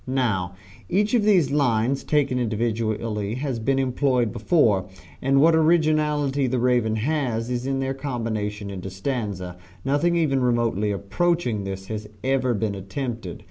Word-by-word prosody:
Now, 110 -9 0 0.3
each 210 +5 +1
of 240 - +4
these 180 -10 +4
lines 130 -2 +1
taken 140 -4 +1
individually 110 -2 -1
has 130 -2 -3
been 135 +4 +1
employed 130 -3 +1
before, 105 - +2 0.3
and 135 +1 +3
what 165 +3 +6
originality 155 -4 +2
the 130 +1 0
"Raven" 120 -3 +2
has, 120 -2 -1
is 125 +1 -2
in 135 0 0
their 135 0 -1
combination 110 -7 -3
into 95 -1 -6
stanza; 95 -4 -4 0.3
nothing 145 +6 +2
even 145 -6 +2
remotely 120 -4 +1
approaching 110 - 0
this 95 0 -5
has 105 0 -6
ever 130 -2 +1
been 105 -1 -1
attempted. 100 0 -5
125 Hz, 140 wpm, -24 LUFS, 105-140 Hz, 0.3 s, what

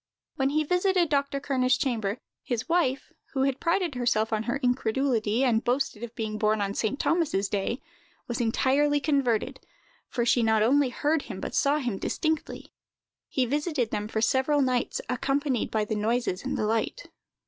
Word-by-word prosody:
When 270 0 +1
he 305 +2 +1
visited 360 +1 +2
Dr. 280 -1 0
Kerner's 260 -2 +1
chamber, 230 -6 -1 0.2
his 240 -3 -3
wife, 330 -6 0 0.2
who 265 - +1
had 270 -1 0
prided 340 -1 +1
herself 235 -3 0
on 215 - +1
her 245 - +1
incredulity, 245 -2 +1
and 235 -3 +2
boasted 245 -3 -1
of 235 0 -7
being 215 -2 -3
born 215 0 +2
on 200 -1 -1
St. 220 +6 -1
Thomas's 305 - +1
day, 205 +5 -2 0.4
was 240 0 -2
entirely 280 +5 +2
converted, 275 -6 0 0.5
for 240 -2 -1
she 240 0 +3
not 220 -1 +3
only 275 +3 +3
heard 295 +5 0
him, - - -8
but - - -5
saw 285 +1 +3
him 245 -9 -2
distinctly. 315 -2 -2 0.6
He 260 - +1
visited 290 -2 -1
them 210 0 -2
for 220 0 -2
several 275 +4 +2
nights, 250 -2 0
accompanied 270 +1 0
by 215 -1 0
the 215 - -3
noises 215 -2 0
and - - -2
the - - 0
light. 225 - -1
255 Hz, 170 wpm, -27 LUFS, 225-285 Hz, 0.6 s, she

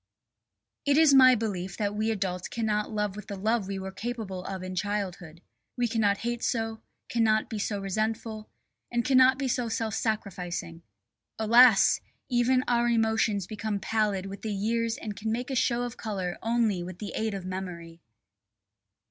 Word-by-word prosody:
It 285 0 +3
is 315 -3 +6
my 255 -1 +8
belief 195 -5 -3
that 205 -2 -1
we 215 +1 0
adults 185 -4 -2
cannot 215 -2 -1
love 210 -2 -2
with 210 - -9
the 200 - -5
love 215 +1 0
we 195 0 -3
were 190 0 -5
capable 215 -4 -5
of 190 -1 -5
in 185 0 -5
childhood. 185 -4 -4 0.3
We 245 -1 +2
cannot 215 -3 +2
hate 240 0 -2
so, 225 -2 -1 0.3
cannot 220 -1 +1
be 220 - -3
so 205 0 -2
resentful, 215 +2 -3 0.4
and 240 -1 0
cannot 260 0 +5
be 275 -1 -1
so 245 -2 -1
self 225 -1 -2
sacrificing. 180 -7 -3 0.6
Alas! 230 0 +6 0.3
even 255 +1 +3
our 240 0 +2
emotions 220 -4 +1
become 215 0 -3
pallid 205 -3 0
with 195 0 -7
the 220 - -3
years 230 +3 0
and 210 -2 -6
can 220 +2 -3
make 245 +4 -3
a - - -1
show 240 0 +1
of 245 0 -5
colour 190 -5 -4
only 225 -5 +1
with 180 0 -7
the 205 +1 -6
aid 220 -2 -1
of 190 -2 -6
memory. 175 -3 -6
215 Hz, 170 wpm, -28 LUFS, 195-235 Hz, 0.6 s, my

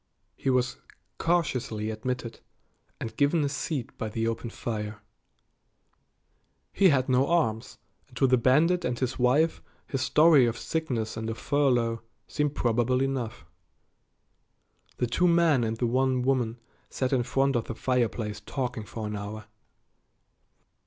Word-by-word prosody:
He 135 - -2
was 125 -1 +1 0.4
cautiously 125 -10 0
admitted 120 +1 -4 0.6
and 110 - -6
given 145 +2 +2
a 140 - 0
seat 140 -2 -4
by 110 - -2
the 115 +1 -2
open 115 +1 -3
fire. 110 -2 -5 1.7
He 195 -2 +5
had 130 -4 +2
no 130 +1 +3
arms, 130 -8 0 0.3
and 125 -3 -15
to 135 - +4
the 130 -1 +5
bandit 160 +9 +3
and 125 -7 -1
his 130 0 -2
wife 140 +7 +2 0.2
his 135 - -3
story 150 -1 +5
of 115 0 -2
sickness 120 -9 -3
and 110 0 -3
a 115 - -3
furlough 120 -5 +1 0.3
seemed 150 -1 -1
probable 120 +2 +1
enough. 125 -8 -2 1.5
The - - +1
two 180 +9 +2
men 170 -6 +4
and 110 0 -2
the 120 - 0
one 130 +1 +1
woman 125 -3 0 0.3
sat 130 0 -1
in 130 - +3
front 135 +2 +1
of 115 - 0
the 115 - -6
fireplace 115 -5 -1
talking 125 -1 -4
for 110 0 -6
an 105 0 -4
hour. 105 +1 -6
125 Hz, 145 wpm, -27 LUFS, 115-140 Hz, 1.7 s, He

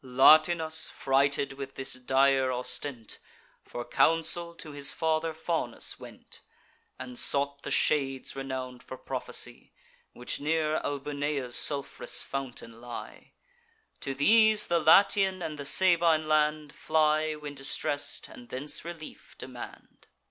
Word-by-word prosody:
Latinus, 155 +5 +4
frighted 140 +1 0
with 135 0 -8
this 135 - -2
dire 130 +1 +2
ostent, 125 -1 -4 0.4
For 120 - -7
counsel 170 +1 +1
to 165 -2 -10
his 145 -1 +1
father 160 0 -1
Faunus 160 +1 -3
went, - - -13 0.6
And 125 -1 -6
sought 140 0 +3
the - - -6
shades 135 -3 0
renown'd 130 -2 -6
for - - -10
prophecy - - -4 0.4
Which 125 - -4
near 155 +1 0
Albunea's 145 -2 -3
sulph'rous 140 -2 +2
fountain 120 -4 -7
lie. 120 -1 -10 0.7
To 135 - -5
these 215 +8 +5
the 170 0 +1
Latian 190 +3 +4
and 155 -2 -6
the 145 - -6
Sabine 170 -3 +4
land 150 -1 +1
Fly, 155 0 +1
when 150 -1 -8
distress'd, 145 +1 -3
and 120 - -14
thence 140 +4 -5
relief 165 -2 -10
demand. - - -11
145 Hz, 120 wpm, -28 LUFS, 135-160 Hz, 0.7 s, these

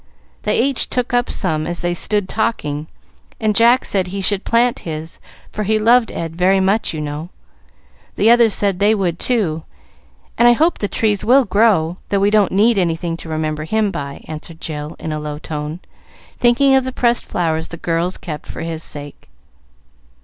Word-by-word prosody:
They 210 - 0
each 270 +1 +1
took 250 -1 -2
up 245 0 +1
some 155 -5 -1
as 175 0 -1
they 175 0 0
stood 205 +2 0
talking, 155 -9 -2 0.5
and 215 -2 0
Jack 235 +4 +4
said 190 -2 +1
he 195 +2 -5
should 195 +1 +1
plant 235 +1 +2
his, 160 0 -6 0.3
for 215 - -4
he 215 +1 +1
loved 230 +2 +3
Ed 165 -1 -5
very 185 +2 +3
much, 195 +4 +1
you 155 - -5
know. 150 +2 -5 0.9
The 225 - +4
others 235 -2 +5
said 200 -3 0
they 210 +2 +4
would, 175 -4 -1
too; 190 -11 0 0.8
and 240 - +6
I 240 - +7
hope 320 +8 +1
the 205 - -1
trees 210 -1 0
will 260 +3 +5
grow, 195 -5 +2
though 200 - +1
we 200 +1 +2
don't 210 -3 +3
need 210 +2 +3
anything 170 -1 -1
to 165 - -10
remember 155 -1 -2
him 215 +3 0
by," 140 -5 -7
answered 160 +1 -8
Jill, 150 -1 -6
in 160 - -5
a 155 - -3
low 150 -1 -5
tone, 150 +2 -6 0.6
thinking 250 +3 +4
of 265 -1 +4
the 260 - -4
pressed 240 -1 +1
flowers 160 -2 -1
the 170 - -8
girls 170 +2 -1
kept 155 -4 -7
for - - -7
his 165 -1 -4
sake. 145 - -9
190 Hz, 185 wpm, -18 LUFS, 160-225 Hz, 0.9 s, I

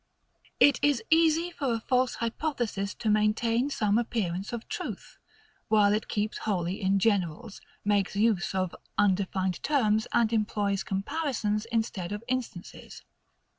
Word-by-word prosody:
It 285 - +6
is 290 -5 +2
easy 325 +1 +4
for 270 -8 -1
a - - -2
false 255 +1 +1
hypothesis 230 -5 -2
to 225 - -5
maintain 225 +4 +2
some 215 -5 +1
appearance 200 -5 -2
of 235 -1 -6
truth, - - -6 0.5
while 210 -2 +4
it 215 - -1
keeps 210 +1 -2
wholly 185 -2 -2
in 195 +1 +2
generals, 195 -2 0 0.2
makes 205 -1 +1
use 205 -3 +1
of 185 -2 -1 0.2
undefined 190 -2 +1
terms, 220 -7 +2
and 230 -1 +2
employs 205 -2 0
comparisons, 215 -1 -2
instead 225 -6 -2
of 205 +2 -5
instances. 250 -8 -5
215 Hz, 130 wpm, -28 LUFS, 200-240 Hz, 0.5 s, It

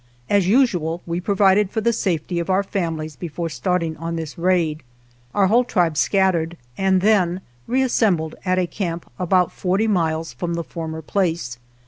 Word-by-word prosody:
As 200 -3 +3
usual 180 - +2
we 170 +1 -2
provided 200 0 +3
for 220 - -2
the 235 +2 +1
safety 175 -4 -1
of 170 - -4
our 190 +1 +3
families 165 -6 -3
before 170 +1 -4
starting 165 +4 -1
on 165 +2 -4
this 160 -2 -5
raid. 170 -3 +1 0.5
Our 200 - +4
whole 230 +6 +4
tribe 175 -9 +1
scattered 175 -2 +1 0.2
and 190 -1 +2
then 190 -3 +2 0.3
reassembled 220 -11 +1
at 185 -1 +1
a 185 - +2
camp 170 -2 -5
about 180 0 +2
forty 190 +4 0
miles 165 -5 0
from 170 -1 -3
the 170 - -2
former 160 -1 -6
place. 165 -9 -1
180 Hz, 160 wpm, -21 LUFS, 165-195 Hz, 0.5 s, Our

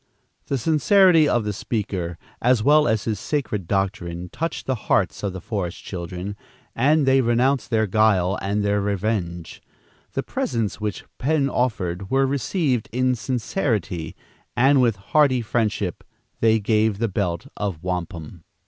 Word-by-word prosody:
The 140 - 0
sincerity 160 - +4
of 120 - +2
the 105 0 -2
speaker, 95 -5 -3 0.2
as 120 -2 +3
well 150 +2 +5
as 110 -2 +1
his 110 -4 -2
sacred 110 - -2
doctrine, 90 -3 -2
touched 165 - -4
the 130 - 0 0.2
hearts - - +2
of 100 - -2
the 95 - -6
forest 90 -3 -4
children, 90 +2 -5 0.4
and 145 +4 +3
they 135 0 +4
renounced 125 +3 +1
their 110 -2 +2
guile 100 -2 +2
and 100 +1 -1
their 100 0 +1
revenge. 100 -4 -2 0.5
The - - -1
presents 110 -4 -2
which 105 -2 -3
Penn 140 0 +1
offered 95 -6 -1
were 135 +1 +3
received 135 - -1
in 130 +2 +1
sincerity, 110 - -2 0.4
and 135 +2 +5
with 115 -4 +3
hearty 130 +5 +2
friendship 105 -5 -1 0.4
they 110 0 +4
gave 110 0 +1
the 115 +2 0
belt 95 0 -2
of 95 -6 -4
wampum. 85 -2 -5
110 Hz, 145 wpm, -23 LUFS, 95-130 Hz, 0.5 s, well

